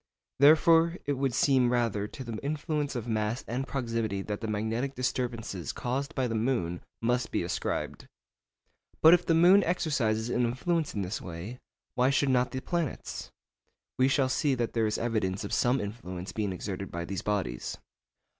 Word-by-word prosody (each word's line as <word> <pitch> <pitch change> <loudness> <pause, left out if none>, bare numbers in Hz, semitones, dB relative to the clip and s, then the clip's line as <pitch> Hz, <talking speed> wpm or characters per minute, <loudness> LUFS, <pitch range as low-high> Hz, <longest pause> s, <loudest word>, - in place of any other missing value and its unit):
Therefore 165 +4 +6
it 145 - +1
would 135 -1 0
seem 130 -4 +3
rather 115 -4 0
to 130 - -8
the 115 -3 -5
influence 150 -1 -2
of 120 -1 -4
mass 110 +1 -1
and 130 +4 -3
proximity 115 -6 -2
that 105 0 -4
the 110 - -3
magnetic 110 +6 -2
disturbances 120 -7 -2
caused 135 +3 -3
by 130 -2 +1
the 115 - -3
moon 110 -7 -1 0.2
must 125 +1 +1
be - - -1
ascribed. 85 - -3 1.0
But 160 +2 +10
if 180 0 +3
the 165 - +4
moon 180 +4 +7
exercises 125 -10 0
an 125 - +1
influence 145 +7 -1
in 100 - -1
this 95 +5 -4
way, 90 +8 -7 0.3
why 125 +1 +3
should 140 0 +2
not 125 -1 +3
the 130 - -4
planets? 170 -5 -3 0.7
We 130 - +5
shall 135 -1 +2
see 135 +1 +1
that 120 -2 -2
there 115 -2 +2
is 105 - -1
evidence 110 -4 -1
of 100 - -5
some 125 +2 +3
such - - -2
influence 95 -4 -7
being 105 -3 -2
exerted 95 +1 -5
by 85 0 -4
these 95 +1 -4
bodies. 95 -13 -2
120 Hz, 175 wpm, -29 LUFS, 105-140 Hz, 1.0 s, But